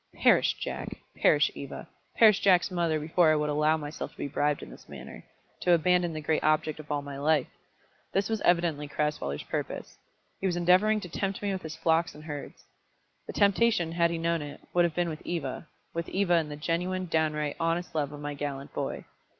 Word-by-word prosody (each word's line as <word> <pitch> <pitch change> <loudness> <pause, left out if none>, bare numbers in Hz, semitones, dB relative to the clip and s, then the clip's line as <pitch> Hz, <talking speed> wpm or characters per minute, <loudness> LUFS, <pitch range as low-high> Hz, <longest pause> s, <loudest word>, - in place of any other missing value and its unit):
Perish - - +4
Jack! - - -5 0.2
perish - - +4
Eva! - - -8 0.3
perish 215 -3 +6
Jack's 185 -1 +4
mother, 170 -3 +1
before 160 +2 +3
I - - +4
would 150 0 0
allow 150 +2 +3
myself 150 0 -5
to - - -26
be - - -3
bribed 145 +1 0
in - - -10
this - - -14
manner, - - -10 0.4
to 175 - +3
abandon 175 +1 +3
the 155 -1 -5
great 155 +1 0
object 155 0 +1
of 150 -1 -9
all 145 -1 -1
my 140 -1 -7
life! 150 -2 +3 0.7
This 195 0 +1
was 220 -1 -2
evidently 170 -4 +2
Crasweller's 145 - -2
purpose. - - -5 0.4
He 195 - 0
was 180 - 0
endeavouring 185 +5 +4
to 180 - -6
tempt 195 +3 -3
me 200 - 0
with 190 - -4
his 160 -2 -7
flocks 165 +1 +1
and 150 - -11
herds. 145 -2 -7 0.6
The - - -6
temptation, 200 -4 +3
had 170 0 +2
he 170 - -2
known 165 0 0
it, 145 -1 -8
would 175 -1 +4
have 170 - -2
been 175 -1 +1
with 155 -2 -5
Eva, 160 -3 -4 0.3
with 170 0 -3
Eva 190 -2 +1
and 165 -3 +2
the 150 - -5
genuine, 180 +5 -1
downright, 155 -3 0
honest 170 +1 -1
love 145 -3 -1
of 145 - -8
my 145 0 -4
gallant 140 -1 -5
boy. - - -3
165 Hz, 205 wpm, -28 LUFS, 150-175 Hz, 0.7 s, perish